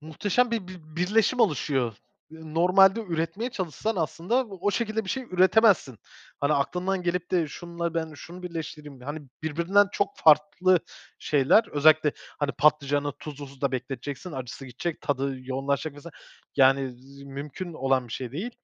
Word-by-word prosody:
Muhteşem 205 +10 0
bir 225 -5 -2
bir 185 -1 -9 0.2
birleşim 220 +7 +2
oluşuyor. 140 - +1 0.4
Iıı, 160 -1 -11
normalde 190 +5 +5
üretmeye 180 +4 -3
çalışsan 195 - -3
aslında 180 - 0
o 195 0 -2
şekilde 220 +1 -1
bir 190 - -4
şey 265 - -2
üretemezsin. 185 - +3 0.4
"Hani 145 +1 +2
aklından 180 +6 0
gelip 180 0 -2
de 170 -4 +1
şununla 170 +2 -5
ben 160 -1 -2
şunu 175 +5 -11
birleştireyim." 155 -5 -7
hani 145 +5 -5 0.2
birbirinden 170 +6 +3
çok 200 - -1
farklı 160 +4 +4 0.4
şeyler. 145 - +4
Özellikle, 150 0 +5 0.3
hani 145 -1 0
patlıcanı 145 -1 +2
tuzlu 145 0 -9
suda 135 0 -3
bekleteceksin, 135 +6 -5
acısı 130 0 -7
gidecek, 155 +7 -4
tadı 140 -1 -1
yoğunlaşacak 135 +3 -2
mesela, 145 +2 -11 0.4
yani, 135 -1 +4
z 140 +2 -15
mümkün 140 +6 -7
olan 135 -4 0
bir 115 - -8
şey 125 -2 -5
değil 190 - -4
160 Hz, 150 wpm, -26 LUFS, 140-185 Hz, 0.4 s, normalde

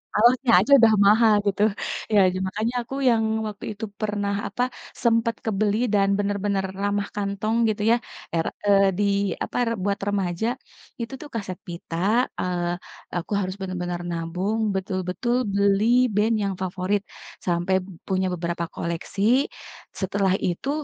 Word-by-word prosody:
alasnya 240 +3 +4
aja 215 +9 0
udah 225 -2 +6
mahal, 220 +2 +6
gitu. 200 0 0 0.5
Iya, 210 - +5
ja 185 - -3
makanya 215 +5 -2
aku, 240 +3 -7
yang 225 -2 +3 0.2
waktu 210 +1 -7
itu, 220 - -4 0.2
pernah, 205 -1 -1
apa, 200 +5 -1 0.4
sempat 230 -1 +2
kebeli 210 -1 +1 0.2
dan 200 -1 +4
benar-benar 200 -1 0 0.2
ramah 205 0 0
kantong, 205 +2 -1
gitu 215 0 -2
ya, - - +6 0.4
er 165 - +1 0.2
eee, 200 -1 +5
di, 205 - +2 0.4
apa, - - -6
re 230 - +1
buat 200 0 0
remaja. 195 0 0 0.5
Itu 230 +2 -5
tuh, 300 - -8
kaset 195 -5 -4
pita, 170 -1 -6 0.4
eee, 175 -1 -1 0.5
aku 175 - -5
harus 185 0 -3
bener-bener 180 -2 -3
nabung, 175 +6 -2 0.2
betul-betul 190 +4 -1 0.2
beli 200 +1 +3 0.3
band 215 +2 +3
yang 195 -1 -1
favorit, 185 +2 -1 0.4
sampai 175 +1 +1 0.3
punya 190 -1 +1
beberapa 170 0 -2
koleksi. 170 +3 -4 0.8
Setelah 190 0 +1
itu, 180 +10 -2
200 Hz, 140 wpm, -24 LUFS, 185-215 Hz, 0.8 s, udah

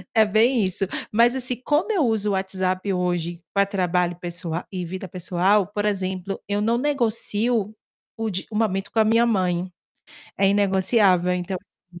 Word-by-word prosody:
É 220 -1 +6
bem 220 +2 +3
isso. 190 +1 -1 0.3
Mas 235 +4 +4
assim, 255 -1 -2
como 310 +9 +1
eu 340 -10 +2
uso 215 -2 0
o - - +1
WhatsApp 190 0 -1
hoje 175 -1 -2
pra 200 0 +3
trabalho 180 -3 0
pessoa 170 -1 -4
e 185 -2 -4
vida 185 +2 -6
pessoal, 185 +3 +1
por 205 0 -3
exemplo, 190 -1 -2
eu 205 0 -1
não 230 +3 +2
negocio 230 -5 0 0.4
o 225 -1 -2
de 185 -1 -3
o - - -6
momento 195 -3 -1
com 225 - 0
a - - +6
minha 230 +2 +4
mãe. 185 -4 0 0.7
É 195 0 +4
inegociável, 190 -2 +3
então 180 -1 -7
195 Hz, 165 wpm, -23 LUFS, 180-220 Hz, 0.7 s, É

